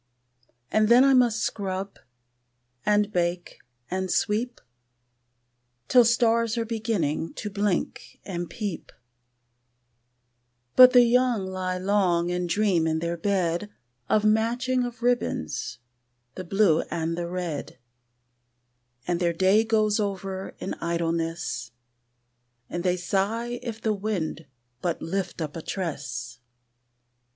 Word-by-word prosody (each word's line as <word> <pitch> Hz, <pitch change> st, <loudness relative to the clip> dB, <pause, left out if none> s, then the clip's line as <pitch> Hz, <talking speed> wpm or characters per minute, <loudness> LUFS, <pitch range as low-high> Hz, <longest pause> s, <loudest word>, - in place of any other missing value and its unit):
And 215 Hz, 0 st, +3 dB
then 245 Hz, +2 st, +7 dB
I 275 Hz, 0 st, +5 dB
must 240 Hz, -3 st, +3 dB
scrub, 195 Hz, -3 st, -3 dB, 0.8 s
and 210 Hz, 0 st, +2 dB
bake, 175 Hz, 0 st, -2 dB, 0.3 s
and 190 Hz, 0 st, -2 dB
sweep, 225 Hz, +7 st, 0 dB, 1.3 s
Till 245 Hz, -2 st, +7 dB
stars 230 Hz, 0 st, +2 dB
are 230 Hz, -, 0 dB
beginning 210 Hz, -9 st, -2 dB
to 210 Hz, -, -5 dB
blink 200 Hz, -2 st, -2 dB
and 175 Hz, -3 st, -4 dB
peep; 210 Hz, -7 st, -5 dB, 1.8 s
But 255 Hz, 0 st, +9 dB
the 245 Hz, -1 st, +8 dB
young 240 Hz, -3 st, +2 dB
lie 185 Hz, -1 st, -3 dB
long 180 Hz, -3 st, +1 dB
and 180 Hz, 0 st, -2 dB
dream 185 Hz, -4 st, +2 dB
in 160 Hz, 0 st, +1 dB
their 170 Hz, +1 st, -2 dB
bed 180 Hz, +1 st, -1 dB, 0.4 s
Of 215 Hz, -, +3 dB
the 215 Hz, -, +5 dB
matching 245 Hz, +4 st, +1 dB
of 240 Hz, -1 st, -7 dB
ribbons, 240 Hz, -, -1 dB, 0.6 s
the 185 Hz, -, -7 dB
blue 185 Hz, -3 st, +3 dB
and 165 Hz, 0 st, -2 dB
the 170 Hz, 0 st, -3 dB
red, 175 Hz, -4 st, -4 dB, 1.3 s
And 175 Hz, -1 st, -1 dB
their 170 Hz, -1 st, +1 dB
day 190 Hz, +5 st, +4 dB
goes 215 Hz, -1 st, +2 dB
over 195 Hz, -2 st, -4 dB
in -, -, -4 dB
idleness, 170 Hz, -3 st, -2 dB, 1.0 s
And 175 Hz, -, -3 dB
they 180 Hz, -1 st, +1 dB
sigh 225 Hz, +7 st, -1 dB
if 225 Hz, -2 st, -6 dB
the 220 Hz, -1 st, 0 dB
wind 190 Hz, -7 st, -3 dB, 0.3 s
but 170 Hz, -2 st, -1 dB
lift 185 Hz, -1 st, -3 dB
up 150 Hz, -1 st, -6 dB
a 165 Hz, -, -5 dB
tress. 140 Hz, -9 st, -5 dB
195 Hz, 120 wpm, -26 LUFS, 170-225 Hz, 1.8 s, But